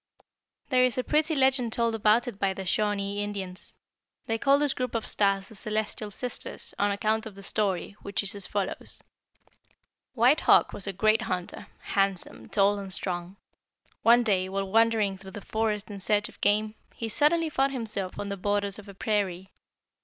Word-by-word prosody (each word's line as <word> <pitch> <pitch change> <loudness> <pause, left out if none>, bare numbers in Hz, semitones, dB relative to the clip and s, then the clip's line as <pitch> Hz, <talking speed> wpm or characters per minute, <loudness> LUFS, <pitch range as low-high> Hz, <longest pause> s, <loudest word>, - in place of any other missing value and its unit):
"There 255 -2 +4
is 255 -1 +1
a 255 - +1
pretty 310 +3 +1
legend 265 -4 +2
told 230 -1 +1
about 225 +3 +3
it 215 -5 -6
by 195 -1 +1
the 190 - -6
Shawnee 205 +1 0
Indians. 195 -3 -4 0.5
They 225 0 -1
call 275 +3 +4
this 290 -1 +2
group 250 -2 -3
of 225 - -1
stars 195 -1 +1
the - - -14
'Celestial 215 0 -2
Sisters,' 245 +4 -3
on 205 - +3
account 215 +2 0
of 210 - -11
the 195 - -10
story, 195 -3 -1
which 200 +1 -2
is 200 +2 +2
as 200 -2 -2
follows: 200 -2 -4 1.1
"White 250 +6 +5
Hawk - - +4
was 205 - -5
a - - -1
great 215 +4 +2
hunter, 185 -4 -4
handsome, 195 -2 -1
tall, 200 0 +3
and 195 -1 -7
strong. 180 0 -4 0.7
One 240 +1 +6
day, 190 -4 +1
while 195 0 -3
wandering 220 -3 +3
through 190 +1 -10
the - - -7
forest 215 -1 -2
in 200 - -7
search 210 +2 +1
of - - -17
game, 215 +1 +2 0.2
he 230 - -4
suddenly 310 +8 +2
found 270 -1 +2
himself 215 -7 -3
on 200 0 -4
the 200 - -3
borders 205 +1 -1
of 205 - -12
a 200 - -11
prairie. 195 -3 -1
205 Hz, 185 wpm, -27 LUFS, 195-230 Hz, 1.1 s, One